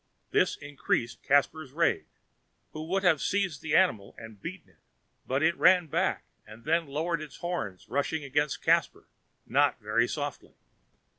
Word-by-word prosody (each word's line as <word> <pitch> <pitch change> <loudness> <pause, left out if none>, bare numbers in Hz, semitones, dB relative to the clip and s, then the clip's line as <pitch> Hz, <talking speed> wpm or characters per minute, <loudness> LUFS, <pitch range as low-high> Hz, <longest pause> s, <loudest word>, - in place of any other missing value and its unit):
This - - +2
increased 145 -4 -2
Caspar's 145 0 +1
rage, 165 +2 +1 0.6
who 155 +1 -7
would 190 +3 0
have 165 -6 +4
seized 195 -8 -1
the 160 -2 -1
animal 110 - +2
and 110 -3 -11
beaten 170 -2 -8
it; - - -32 0.5
but 135 +3 0
it 165 +2 +3
ran 180 -2 +5
back, 155 - -1 0.2
and 110 +2 -14
then 165 +1 +1
lowering 160 +3 -2
its 150 -3 -9
horns 145 - -4
rushed 140 +4 -1
against 145 -1 -1
Caspar, - - +1 0.4
not - - +2
very 110 +3 +1
softly. 145 -1 -5
150 Hz, 150 wpm, -29 LUFS, 130-170 Hz, 0.6 s, ran